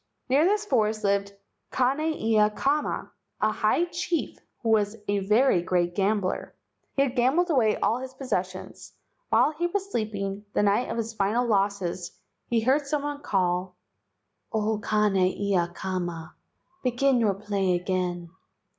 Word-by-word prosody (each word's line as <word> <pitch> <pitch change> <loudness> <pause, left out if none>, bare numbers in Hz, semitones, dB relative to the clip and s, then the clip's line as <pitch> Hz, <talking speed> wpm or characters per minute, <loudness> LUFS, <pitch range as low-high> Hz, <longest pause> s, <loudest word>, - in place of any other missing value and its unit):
Near 280 +5 +4
this 420 +3 +2
forest 220 - +1
lived 200 0 +1 0.4
Kane 260 +3 +1
ia 225 -9 +2
kama, 280 +7 -1 0.3
a - - +2
high 345 - +2
chief, 340 -1 -3 0.2
who 230 - 0
was 215 0 +2
a 205 0 +1
very 210 0 +3
great 175 0 0
gambler. 195 0 -1 0.4
He 275 - +4
had 260 -2 -2
gambled 295 +9 +2
away 230 -7 +3
all 230 - +1
his 260 0 -8
possessions. 185 -8 -4 0.4
While - - +4
he 335 +3 -1
was 395 +2 -3
sleeping, 205 - -3
the - - +3
night 205 +4 +2
of 230 - -3
his 225 0 -3
final 215 +4 +1
losses, 195 -5 -1 0.3
he 230 -1 +1
heard 275 +5 +2
some 290 0 -1
one 290 0 -4
call, 180 -3 0 0.8
"O 220 -1 0
Kane 210 -2 +1
ia 185 -1 +1
kama, 175 -3 -4 0.5
begin 255 +1 +2
your 210 -4 +2
play 195 -2 0
again." 175 -1 -2
215 Hz, 145 wpm, -26 LUFS, 195-260 Hz, 0.8 s, Near